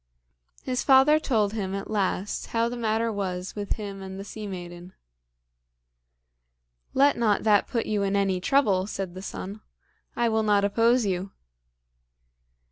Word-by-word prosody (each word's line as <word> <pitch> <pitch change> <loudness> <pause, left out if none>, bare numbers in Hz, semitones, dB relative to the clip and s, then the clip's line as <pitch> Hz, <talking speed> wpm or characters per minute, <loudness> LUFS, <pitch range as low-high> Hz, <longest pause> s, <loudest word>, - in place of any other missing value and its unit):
His 255 -1 -1
father 275 +3 +6
told 215 -8 +1
him 195 -3 -3
at 195 - -5
last 200 -1 -2
how 230 0 0
the 240 - -4
matter 225 -1 0
was 185 -2 -4
with 205 -1 -2
him 200 -2 -7
and 190 0 -7
the - - -5
sea 210 +1 -7
maiden. 175 -1 -8 2.0
"Let 280 +2 +4
not 215 -3 +2
that 210 -2 +4
put 230 -2 -1
you 210 -1 -1
in 200 0 0
any 195 -2 +1
trouble," 200 -7 +2
said 195 -4 -5
the 185 - -8
son; 200 +2 -7 0.5
"I 240 - +1
will 220 -1 +1
not 205 -2 +3
oppose 230 +3 +3
you." 190 0 -2
205 Hz, 150 wpm, -26 LUFS, 195-230 Hz, 2.0 s, father